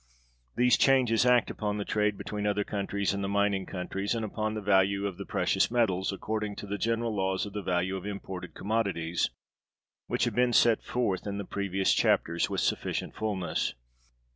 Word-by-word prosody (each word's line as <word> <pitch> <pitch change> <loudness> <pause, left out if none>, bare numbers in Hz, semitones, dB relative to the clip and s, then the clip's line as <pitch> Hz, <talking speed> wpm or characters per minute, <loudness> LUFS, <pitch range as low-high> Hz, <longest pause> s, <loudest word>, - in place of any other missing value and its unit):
These 125 0 +4
changes 125 -3 +4
act 125 -1 +4
upon 105 -1 -2
the 100 - -3
trade 105 -1 +1
between 105 -1 -3
other 105 0 +1
countries 100 -1 -1
and 100 0 -3
the - - -1
mining 100 -1 +1
countries, 95 +3 -3
and 115 -1 -2
upon 110 0 -2
the - - -2
value 100 0 +3
of 95 -2 -4
the 100 - -6
precious - - +1
metals, 105 -6 +1
according 105 +1 -3
to - - -7
the 100 0 -4
general 115 +1 0
laws 95 0 0
of 100 - -8
the 105 - -3
value 95 0 0
of 95 +1 -5
imported 95 -2 -6
commodities: 95 -6 0 0.8
which - - 0
have - - -1
been 125 0 +2
set 115 -2 +5
forth 105 -6 -1
in 100 0 -3
the 100 - -4
previous 95 0 0
chapters 85 +1 +2
with - - -1
sufficient - - -1
fullness. 100 -11 -2
100 Hz, 185 wpm, -29 LUFS, 95-110 Hz, 0.8 s, set